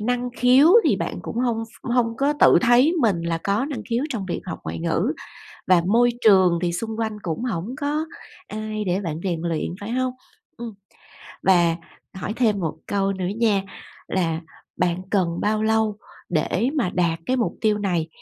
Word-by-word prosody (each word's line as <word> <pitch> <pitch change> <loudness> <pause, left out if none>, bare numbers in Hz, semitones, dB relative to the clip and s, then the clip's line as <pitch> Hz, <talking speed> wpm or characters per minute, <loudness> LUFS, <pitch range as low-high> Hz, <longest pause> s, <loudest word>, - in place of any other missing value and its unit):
năng 245 +3 -1
khiếu 255 +5 +6 0.2
thì - - +3
bạn - - -4
cũng - - -6
hông 235 -2 0
ph 225 - -20
hông 230 -2 +1
có 280 +4 +2
tự - - +7
thấy 250 +5 +5
mình 200 -9 +2
là 170 0 -1
có 200 +5 +1
năng 285 -2 -5
khiếu 240 +3 0
trong 225 -9 -4
việc 175 - -3
học 180 - -5
ngoại 80 +1 -4
ngữ, - - 0 0.5
và 180 -2 +5
môi 235 +5 +4
trường 185 -5 +6
thì 175 - 0
xung 220 +5 -4
quanh 220 -1 -1
cũng 170 +7 -3
hổng 220 +1 -3
có 300 +2 -1 0.4
ai 215 0 -4
để 185 +1 0
bạn 165 -4 -4
rèn 170 -4 -1
luyện, 170 0 -2
phải 205 +3 -6
hông? 255 +1 0 0.4
Ừm. 230 -3 -7 0.7
Và 175 -3 +4 0.4
hỏi 190 +3 -4
thêm 220 -5 +2
một 160 -4 -2
câu 195 -1 0
nữa 185 -2 -3
nha, 215 -4 +2 0.5
là 165 -3 -1 0.4
bạn 175 0 0
cần 175 -4 0
bao 215 +1 +1
lâu 220 -1 +1 0.3
để 180 +8 0
mà 245 -11 +1
đạt 170 -2 +1
cái 255 0 +1
mục 235 - 0
tiêu 215 -1 +2
này, 175 -6 -1
210 Hz, 190 wpm, -23 LUFS, 175-235 Hz, 0.7 s, tự